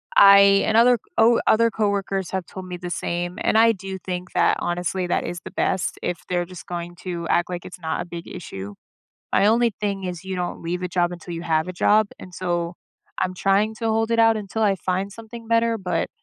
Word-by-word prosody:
I 200 Hz, 0 st, +8 dB
and 220 Hz, -, +2 dB
other 240 Hz, 0 st, +5 dB, 0.2 s
o 230 Hz, +1 st, +5 dB
other 230 Hz, +1 st, +5 dB
coworkers 200 Hz, -3 st, -1 dB
have 190 Hz, -2 st, -2 dB
told 190 Hz, -1 st, -9 dB
me 180 Hz, -, -5 dB
the 175 Hz, 0 st, -6 dB
same, 175 Hz, +1 st, -3 dB
and 220 Hz, -, +2 dB
I 230 Hz, 0 st, +6 dB
do 190 Hz, -1 st, -7 dB
think 180 Hz, 0 st, -5 dB
that, -, -, +3 dB
honestly, 175 Hz, +1 st, -2 dB
that -, -, 0 dB
is 175 Hz, +1 st, -4 dB
the -, -, -8 dB
best 190 Hz, -, -1 dB
if 175 Hz, -1 st, -2 dB
they're 175 Hz, -1 st, 0 dB
just 185 Hz, -1 st, -11 dB
going 175 Hz, 0 st, -6 dB
to 170 Hz, -2 st, -4 dB
act 175 Hz, +1 st, +2 dB
like 175 Hz, -1 st, -5 dB
it's 180 Hz, -, -10 dB
not 160 Hz, 0 st, -2 dB
a 175 Hz, -, -5 dB
big 170 Hz, -1 st, -8 dB
issue. 100 Hz, -, -7 dB, 0.6 s
My 200 Hz, -, +4 dB
only 230 Hz, +1 st, +3 dB
thing 200 Hz, -2 st, -2 dB
is 180 Hz, 0 st, -5 dB
you 190 Hz, -1 st, -4 dB
don't 175 Hz, -1 st, -4 dB
leave 175 Hz, +2 st, -3 dB
a 180 Hz, -, -2 dB
job 175 Hz, 0 st, 0 dB
until 175 Hz, 0 st, -7 dB
you 165 Hz, -, -5 dB
have 160 Hz, 0 st, 0 dB
a -, -, -4 dB
job, 210 Hz, +4 st, +3 dB
and 180 Hz, -1 st, -11 dB
so 175 Hz, -1 st, -2 dB, 0.4 s
I'm 185 Hz, -, -1 dB
trying 200 Hz, +4 st, +2 dB
to 225 Hz, +1 st, -3 dB
hold 225 Hz, +1 st, +1 dB
it 230 Hz, -, +1 dB
out 225 Hz, -1 st, +5 dB
until 215 Hz, +2 st, -3 dB
I 200 Hz, -2 st, +3 dB
find 190 Hz, +2 st, -2 dB
something 230 Hz, +1 st, -11 dB
better, 230 Hz, 0 st, +2 dB
but 185 Hz, -4 st, -2 dB
185 Hz, 225 wpm, -23 LUFS, 175-215 Hz, 0.6 s, I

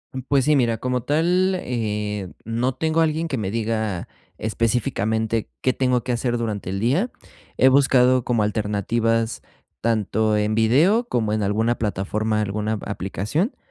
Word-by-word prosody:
Mm, 130 Hz, -, -3 dB
pues, 140 Hz, -2 st, +2 dB
sí, 150 Hz, 0 st, +4 dB
mira, 120 Hz, -4 st, +2 dB
como 125 Hz, +1 st, -1 dB
tal, 175 Hz, +7 st, +2 dB
eh, 105 Hz, -5 st, -3 dB
no 120 Hz, +3 st, -1 dB
tengo 160 Hz, +4 st, +1 dB
alguien 160 Hz, +1 st, +1 dB
que 140 Hz, -5 st, -2 dB
me 105 Hz, -4 st, -2 dB
diga 110 Hz, -4 st, -2 dB, 0.3 s
específicamente 110 Hz, -1 st, -1 dB
qué 130 Hz, -, +2 dB
tengo 125 Hz, -2 st, +1 dB
que 125 Hz, -, -2 dB
hacer 120 Hz, 0 st, 0 dB
durante 110 Hz, -5 st, -3 dB
el 95 Hz, +1 st, -2 dB
día. 145 Hz, -, +1 dB, 0.5 s
He 130 Hz, -, +5 dB
buscado 130 Hz, -2 st, +4 dB
como 115 Hz, -3 st, +1 dB
alternativas 110 Hz, +2 st, 0 dB, 0.4 s
tanto 110 Hz, -1 st, +1 dB
en 105 Hz, +1 st, 0 dB
video 155 Hz, -, +3 dB
como 110 Hz, -3 st, 0 dB
en 110 Hz, -, 0 dB
alguna 110 Hz, +4 st, +1 dB
plataforma, 105 Hz, +1 st, -1 dB
alguna 105 Hz, +1 st, -2 dB
aplicación, 105 Hz, -, -2 dB
115 Hz, 150 wpm, -22 LUFS, 105-130 Hz, 0.5 s, He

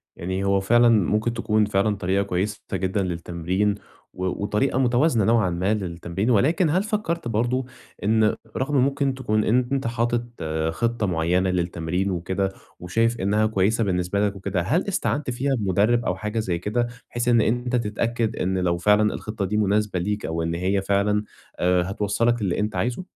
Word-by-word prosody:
يعني 95 Hz, +2 st, -3 dB
هو 100 Hz, 0 st, +2 dB
فعلًا 120 Hz, +4 st, +4 dB
ممكن 110 Hz, +2 st, +2 dB
تكون 110 Hz, -2 st, +1 dB
فعلًا 105 Hz, +1 st, +1 dB
طريقة 95 Hz, +1 st, 0 dB
كويسة 100 Hz, +2 st, -2 dB
ت -, -, -3 dB
جدًا 95 Hz, +1 st, -1 dB
للتمرين، 90 Hz, +3 st, -1 dB, 0.4 s
و 95 Hz, -, -4 dB, 0.2 s
وطريقة 130 Hz, +6 st, 0 dB
متوازنة 125 Hz, -2 st, +3 dB
نوعًا 110 Hz, -5 st, +3 dB
ما 90 Hz, +5 st, 0 dB
للتمرين، 95 Hz, +2 st, -3 dB
ولكن 150 Hz, -, +3 dB
هل 185 Hz, +6 st, +2 dB
فكرت 190 Hz, -, -2 dB
برضه 120 Hz, +3 st, 0 dB, 0.4 s
إن 110 Hz, 0 st, +3 dB, 0.2 s
رغم 140 Hz, +2 st, 0 dB
ممكن 140 Hz, +1 st, +1 dB
تكون 110 Hz, -5 st, 0 dB
أنت 125 Hz, +2 st, +1 dB
حاطط 120 Hz, -2 st, -2 dB, 0.3 s
خطة 115 Hz, +4 st, -1 dB
معينة 90 Hz, +2 st, +1 dB
للتمرين 90 Hz, +1 st, -1 dB
وكده، 95 Hz, +2 st, -1 dB, 0.3 s
وشايف 115 Hz, +6 st, 0 dB
إنها 105 Hz, +3 st, +2 dB
كويسة 110 Hz, +2 st, +1 dB
بالنسبة 95 Hz, +2 st, 0 dB
لك 100 Hz, -, -4 dB
وكده، 95 Hz, -1 st, -2 dB
هل 155 Hz, -, 0 dB
استعانت 150 Hz, -7 st, -1 dB
فيها 135 Hz, +3 st, 0 dB
بمدرب 105 Hz, +3 st, +1 dB
أو 90 Hz, -, 0 dB
حاجة 105 Hz, +3 st, -3 dB
زي 90 Hz, -5 st, -1 dB
كده، 120 Hz, +5 st, -1 dB, 0.2 s
بحيث 120 Hz, +1 st, -3 dB
إن 120 Hz, -2 st, +5 dB
أنت 125 Hz, +2 st, 0 dB
تتأكد 115 Hz, 0 st, -1 dB
إن 95 Hz, +1 st, -1 dB
لو 90 Hz, -1 st, +1 dB
فعلًا 105 Hz, +3 st, +3 dB
الخطة 110 Hz, -2 st, -4 dB
دي 105 Hz, +3 st, -1 dB
مناسبة 105 Hz, -2 st, +1 dB
ليك 105 Hz, +3 st, -2 dB
أو 80 Hz, 0 st, -2 dB
إن 85 Hz, +1 st, -2 dB
هي 95 Hz, +3 st, 0 dB
فعلًا 100 Hz, +2 st, +1 dB, 0.4 s
آآ، 90 Hz, 0 st, +3 dB
هتوَصّلك 115 Hz, +3 st, 0 dB
للي 95 Hz, -2 st, 0 dB
أنت 105 Hz, +1 st, -1 dB
عايزه؟ 125 Hz, +10 st, -1 dB
105 Hz, 170 wpm, -24 LUFS, 95-120 Hz, 0.4 s, إن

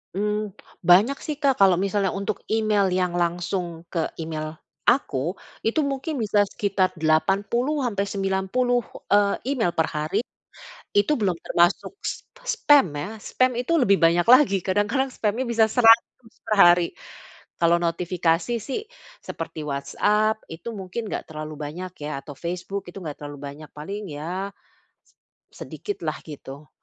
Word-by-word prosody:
Mmm, 210 Hz, 0 st, -1 dB, 0.3 s
banyak 215 Hz, +11 st, +6 dB
sih 305 Hz, -, -4 dB
Kak, 275 Hz, -5 st, +2 dB
kalau 190 Hz, -2 st, +6 dB
misalnya 195 Hz, +1 st, 0 dB
untuk 200 Hz, 0 st, -2 dB
email 215 Hz, -3 st, +2 dB
yang 180 Hz, -1 st, +1 dB
langsung 175 Hz, -1 st, -2 dB
ke 165 Hz, -3 st, 0 dB
email 155 Hz, -1 st, -4 dB, 0.3 s
aku, 175 Hz, -, +2 dB, 0.3 s
itu 300 Hz, +7 st, +2 dB
mungkin 280 Hz, +3 st, -2 dB
bisa 205 Hz, -1 st, +2 dB
sekitar 195 Hz, -3 st, 0 dB
80 200 Hz, -, +1 dB
sampe 200 Hz, -4 st, -1 dB
90, 195 Hz, +6 st, 0 dB, 0.3 s
eee, 205 Hz, -1 st, +4 dB, 0.2 s
email 225 Hz, -11 st, 0 dB
perhari. 160 Hz, +6 st, 0 dB, 0.7 s
Itu 205 Hz, +9 st, +3 dB
belum 190 Hz, -5 st, +1 dB
termasuk 175 Hz, -, +2 dB
spa -, -, -7 dB
spam 290 Hz, -, +5 dB
ya, 145 Hz, +7 st, -4 dB
spam 255 Hz, +4 st, +1 dB
itu 250 Hz, +7 st, -1 dB
lebih 200 Hz, -3 st, +4 dB
banyak 170 Hz, +2 st, +3 dB
lagi, 250 Hz, -7 st, +6 dB
kadang-kadang 205 Hz, +8 st, +1 dB
spamnya 220 Hz, +2 st, -1 dB
bisa 230 Hz, -3 st, +3 dB
100 225 Hz, 0 st, +4 dB
perhari. 175 Hz, -5 st, +5 dB, 0.7 s
Kalau 170 Hz, 0 st, +4 dB
notifikasi 170 Hz, +4 st, 0 dB
sih, 270 Hz, -, -2 dB, 0.4 s
seperti 165 Hz, -1 st, -6 dB
WhatsApp 210 Hz, +11 st, +1 dB
itu 170 Hz, +8 st, -6 dB
mungkin 195 Hz, +4 st, -5 dB
nggak -, -, -3 dB
terlalu 155 Hz, -1 st, -7 dB
banyak 175 Hz, +5 st, -6 dB
ya, 150 Hz, -2 st, -3 dB
atau 145 Hz, 0 st, -10 dB
Facebook 180 Hz, +5 st, -4 dB
itu 195 Hz, -, -9 dB
nggak 150 Hz, -2 st, -5 dB
terlalu 145 Hz, -1 st, -8 dB
banyak, 150 Hz, +1 st, -10 dB
paling 195 Hz, +4 st, -6 dB
ya, 180 Hz, +7 st, -4 dB, 0.5 s
se -, -, -31 dB, 0.5 s
sedikit 410 Hz, -, -5 dB
lah 155 Hz, -, 0 dB
gitu. 145 Hz, -1 st, -10 dB
195 Hz, 140 wpm, -24 LUFS, 165-220 Hz, 0.7 s, banyak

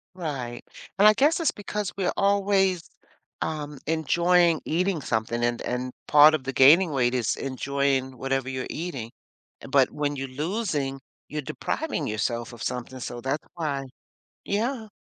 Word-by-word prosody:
Right. 135 Hz, -9 st, -5 dB, 0.3 s
And 205 Hz, -, +6 dB
I 215 Hz, -, +9 dB
guess 295 Hz, +8 st, +3 dB
it's 325 Hz, -, +2 dB
because 205 Hz, -2 st, -4 dB
we're 190 Hz, -2 st, 0 dB
always, 195 Hz, -3 st, +2 dB, 0.5 s
um, 150 Hz, -2 st, -4 dB
enjoying 170 Hz, +1 st, +3 dB
eating 180 Hz, +1 st, 0 dB
something, 115 Hz, -1 st, -1 dB
and 120 Hz, 0 st, 0 dB
and 125 Hz, +1 st, -3 dB, 0.2 s
part 150 Hz, +1 st, +8 dB
of 140 Hz, -, -2 dB
the 135 Hz, -, -3 dB
gaining 160 Hz, +8 st, +6 dB
weight 130 Hz, -3 st, +1 dB
is 120 Hz, -4 st, 0 dB
enjoying 135 Hz, -1 st, -1 dB
whatever 135 Hz, -1 st, -1 dB
you're 130 Hz, -1 st, -4 dB
eating. 135 Hz, -9 st, -5 dB, 0.6 s
But -, -, +4 dB
when 145 Hz, -1 st, -2 dB
you're 135 Hz, 0 st, -4 dB
losing, 150 Hz, -, -2 dB, 0.3 s
you're 150 Hz, -, -3 dB
depriving 170 Hz, -, -3 dB
yourself 115 Hz, +3 st, -2 dB
of 120 Hz, -, -9 dB
something, 125 Hz, +1 st, -4 dB
so 120 Hz, 0 st, -5 dB
that's 135 Hz, +4 st, -3 dB
why 145 Hz, -5 st, -2 dB, 0.6 s
Yeah. 220 Hz, +2 st, -2 dB
145 Hz, 150 wpm, -26 LUFS, 130-180 Hz, 0.6 s, I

